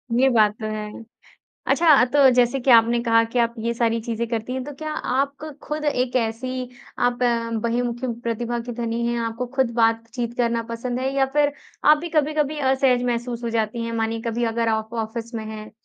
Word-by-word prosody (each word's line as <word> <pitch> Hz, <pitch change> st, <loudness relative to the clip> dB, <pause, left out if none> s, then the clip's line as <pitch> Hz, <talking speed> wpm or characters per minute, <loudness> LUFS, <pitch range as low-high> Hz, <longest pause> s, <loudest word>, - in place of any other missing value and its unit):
ये 265 Hz, +2 st, +4 dB
बात 215 Hz, -4 st, +4 dB
तो -, -, -3 dB
है। 210 Hz, 0 st, -5 dB, 0.8 s
अच्छा, 310 Hz, -7 st, +5 dB
तो 270 Hz, +1 st, +5 dB
जैसे 250 Hz, +2 st, +3 dB
कि 260 Hz, -, +1 dB
आपने 235 Hz, 0 st, +6 dB
कहा 230 Hz, -1 st, +4 dB
कि 230 Hz, +2 st, -3 dB
आप 235 Hz, 0 st, +2 dB
ये 230 Hz, +1 st, -1 dB
सारी 230 Hz, -1 st, +1 dB
चीज़ें 235 Hz, +1 st, -3 dB
करती 230 Hz, +1 st, -3 dB
हैं, 260 Hz, 0 st, -3 dB
तो 290 Hz, -, -7 dB
क्या 310 Hz, +2 st, -5 dB
आप 275 Hz, 0 st, -1 dB
क 310 Hz, -, -7 dB
खुद 300 Hz, 0 st, -4 dB
एक 255 Hz, -3 st, 0 dB
ऐसी 250 Hz, +2 st, -2 dB, 0.3 s
आप 245 Hz, 0 st, +1 dB, 0.4 s
बहिर्मुखी 240 Hz, +1 st, -1 dB, 0.2 s
प्रतिभा 235 Hz, +1 st, -2 dB
की 245 Hz, -, -4 dB
धनी 235 Hz, 0 st, -2 dB
हैं, 235 Hz, 0 st, -1 dB
आपको 230 Hz, +2 st, -3 dB
खुद 260 Hz, -3 st, +2 dB
बातचीत 230 Hz, +1 st, 0 dB
करना 235 Hz, -1 st, +1 dB
पसंद 245 Hz, +2 st, -3 dB
है 265 Hz, +1 st, -1 dB
या 270 Hz, -1 st, +3 dB
फिर 290 Hz, -1 st, +3 dB, 0.3 s
आप 300 Hz, 0 st, +7 dB
भी 340 Hz, +3 st, -5 dB
कभी-कभी 300 Hz, 0 st, +1 dB
असहज 265 Hz, -2 st, +2 dB
महसूस 240 Hz, 0 st, -2 dB
हो 235 Hz, -, -1 dB
जाती 230 Hz, +1 st, -1 dB
हैं? 230 Hz, -, -4 dB
मानिए 225 Hz, 0 st, -1 dB
कभी 235 Hz, +1 st, -1 dB
अगर 230 Hz, -1 st, +1 dB
आप 220 Hz, +1 st, -1 dB
ऑफ़िस 230 Hz, +2 st, -7 dB
में 220 Hz, -, -4 dB
हैं, 215 Hz, 0 st, -8 dB
240 Hz, 200 wpm, -23 LUFS, 230-260 Hz, 0.8 s, आप